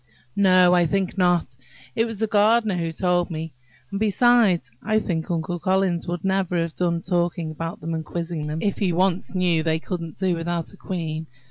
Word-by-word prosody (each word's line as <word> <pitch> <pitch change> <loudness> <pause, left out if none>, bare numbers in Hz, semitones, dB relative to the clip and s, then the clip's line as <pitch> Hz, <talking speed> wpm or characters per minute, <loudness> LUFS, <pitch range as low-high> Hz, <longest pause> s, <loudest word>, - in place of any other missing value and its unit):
"No, 185 -2 +5
I 175 -1 +4
think 190 +2 -1
not. 175 -8 +1 0.4
It 225 - +2
was 225 -2 -5
the - - +3
gardener 215 0 +3
who 165 -2 -2
told 175 +1 0
me. 160 -1 -5 0.4
And, 195 - -3
besides, 215 - +3
I 215 0 +1
think 170 -6 -2
Uncle 170 +1 -2
Collins 185 -1 0
would 175 -1 -3
never 190 -2 +1
have 165 -1 -2
done 170 -1 -1
talking 175 -3 -1
about 165 +2 -6
them 165 +2 -4
and 160 -1 -2
quizzing 165 -1 -4
them, 155 +2 -3
if 200 - -1
he 190 -4 +1
once 185 +2 0
knew 175 -3 +2
they 160 0 +1
couldn't 165 -1 -6
do 190 -2 +1
without 170 0 -3
a - - -12
queen. 160 -4 -4
175 Hz, 195 wpm, -23 LUFS, 165-190 Hz, 0.4 s, No